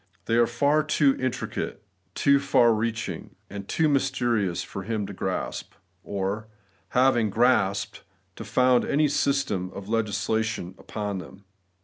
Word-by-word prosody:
They 115 - -1
are 120 0 +5
far 145 +4 +2
too 145 -2 +2
intricate, 130 -1 -3 0.3
too 140 0 +4
far 120 -4 +4
reaching, 110 +1 -3 0.2
and 100 -1 -7
too 160 - +2
mysterious 120 - 0
for 95 - -7
him 105 +1 -2
to - - -7
grasp, - - -4 0.3
or, 100 +2 -3 0.5
having 125 -4 +4
grasped, 105 -3 +1 0.3
to - - -7
found 125 +3 +3
any 150 +2 +2
system 135 -10 0
of 100 - -7
legisla 110 0 0
tion 95 -5 -4
upon 105 -3 -4
them. 95 +2 -12
115 Hz, 135 wpm, -26 LUFS, 100-130 Hz, 0.5 s, are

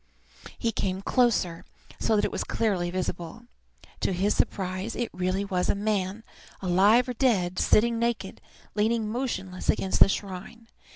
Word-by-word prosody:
He 230 - 0
came 190 -2 -2
closer, 205 -10 +1 0.4
so 220 - +2
that 205 - +2
it - - -2
was - - -2
clearly 195 -6 0
visible. 180 +3 -4 0.6
To - - 0
his 195 +4 +1
surprise 185 +3 -1
it 240 - -2
really 185 +2 -1
was 180 -2 -1
a - - +3
man, 200 0 -1 0.4
alive 200 +7 +4
or 250 - -2
dead, 195 -9 +1
sitting 230 +1 +3
naked, 230 -4 -2 0.3
leaning 220 +1 +1
motionless 190 -7 -3
against 190 - +1
the - - +8
shrine. 210 +4 -5
200 Hz, 150 wpm, -27 LUFS, 185-230 Hz, 0.6 s, the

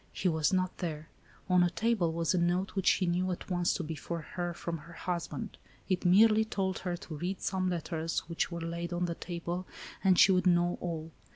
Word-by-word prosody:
He - - -1
was 160 0 +2
not 185 -1 0
there. 155 -3 -4 0.4
On 180 -1 +4
a 175 - +4
table 215 -3 +1
was 165 +1 0
a 180 - +2
note, 175 +3 +1
which 195 -2 -1
she 185 - +4
knew 180 +2 +1
at 180 - -6
once 175 0 +2
to 175 - -2
be 160 +1 -4
for 170 +3 -4
her 175 +2 -4
from 170 -1 -4
her 170 +3 -13
husband. 180 +5 -4 0.3
It 185 -1 0
merely 215 +4 +6
told 190 -3 -2
her 175 -2 -3
to 160 -3 -8
read 180 +5 -3
some 185 -1 0
letters, 165 -1 -2
which 170 +1 -2
were 170 0 -4
laid 170 +1 -4
on 175 +1 0
the 170 - -2
table, 175 +1 -5 0.4
and 190 -2 +5
she 195 - +7
would 185 0 +3
know 175 0 +3
all. 165 -2 -4
175 Hz, 215 wpm, -31 LUFS, 170-185 Hz, 0.4 s, she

